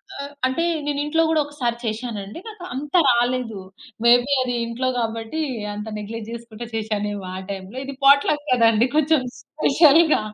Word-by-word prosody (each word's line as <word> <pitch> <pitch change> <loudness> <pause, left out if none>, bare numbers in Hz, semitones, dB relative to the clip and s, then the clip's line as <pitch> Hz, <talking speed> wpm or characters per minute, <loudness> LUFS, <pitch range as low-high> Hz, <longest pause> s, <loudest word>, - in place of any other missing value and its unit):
ఆహ్, 280 -3 -6 0.2
అంటే 260 +6 -1 0.2
నేను 290 -1 -1
ఇంట్లో 325 +2 +2
కూడా 320 -1 +3
ఒకసారి 255 -5 -3
చేశానండి. 215 0 -4
నాకు 430 -5 -10
అంత 285 +3 -6
రాలేదు. 240 -3 +1 0.5
మేబీ 245 +3 +5
అది 250 -1 -1
ఇంట్లో 235 +3 -3
కాబట్టి 225 +5 -3 0.3
అంత 210 +1 -6
నెగ్లెక్ట్ 215 +1 -6
చేసుకుంటే 235 0 -8
చేశానేమో 210 -2 -2
ఆ - - -4
టైంలో. 195 +4 -7
ఇది 275 - -6
పాట్‌లక్ 285 +2 +5
కదండీ, 230 -1 +4
కొంచెం 310 -1 +3 0.2
స్పెషల్‌గా, 310 0 +4
245 Hz, 145 wpm, -22 LUFS, 225-285 Hz, 0.5 s, మేబీ